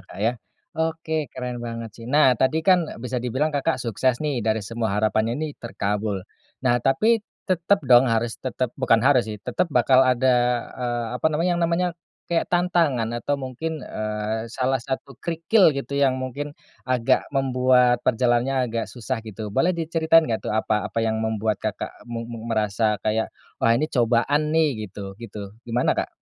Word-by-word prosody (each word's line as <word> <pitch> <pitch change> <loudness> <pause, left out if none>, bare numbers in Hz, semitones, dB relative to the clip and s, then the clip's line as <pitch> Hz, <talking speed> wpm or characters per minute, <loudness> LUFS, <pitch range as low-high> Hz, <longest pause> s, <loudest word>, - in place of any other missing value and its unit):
Kak, 95 - -14
ya. 110 +5 +1 0.4
Oke, 160 -2 -2
keren 125 -1 -5
banget 115 -1 -5
sih. 115 +2 -11
Nah 140 -1 +5
tadi 155 +5 +2
kan 180 -4 +4
bisa 125 0 -2
dibilang 130 +6 -1
Kakak 140 -2 0
sukses 120 +2 +1
nih, 140 -5 0
dari 110 -1 0
semua 110 -1 -2
harapannya 110 +2 +1
ini 155 0 -3
terkabul. 105 -3 -2 0.4
Nah, 120 -1 +3
tapi 215 - +3 0.3
tetep 185 +2 +2
dong 120 0 +8
harus 115 0 0
tetep 130 -1 -2
bukan 115 -4 +3
harus 135 -3 +5
sih, 105 - -4
tetep 125 - -1
bakal 130 +1 +5
ada, 130 0 +2 0.5
eee, 120 -2 -2
apa - - +2
namanya 165 +4 +1
yang - - -2
namanya 170 +2 +1 0.4
kayak 170 -1 +1
tantangan 170 -9 +2
atau 140 +4 -2
mungkin, 150 +5 -4
eee, 110 0 -4
salah 130 +1 +1
satu 130 +1 -5
kerikil 165 - +3
gitu 140 0 -4
yang 135 -2 +2
mungkin 140 +3 -5 0.3
agak 125 -2 +2
membuat 125 -2 +3
perjalanannya 125 +1 +2
agak 115 0 -2
susah 115 -2 -4
gitu. 110 0 -6
Boleh 170 - +2
diceritain 165 -1 +3
gak 110 -2 -2
tuh - - -2
apa 110 0 0
apa 115 - 0
yang 110 -1 0
membuat 110 -1 0
Kakak 105 -2 -5
mu 115 -1 -6
mu 115 -2 -7
merasa 110 -2 0
kayak, 110 +1 -1 0.2
"Wah, 115 - +3
ini 145 +7 +1
cobaan 125 +5 +1
nih," 160 -1 +4 0.2
gitu 100 -2 -8
gitu, 105 -3 -9
gimana, 120 +1 +1
Kak? - - -1
125 Hz, 170 wpm, -23 LUFS, 115-145 Hz, 0.5 s, dong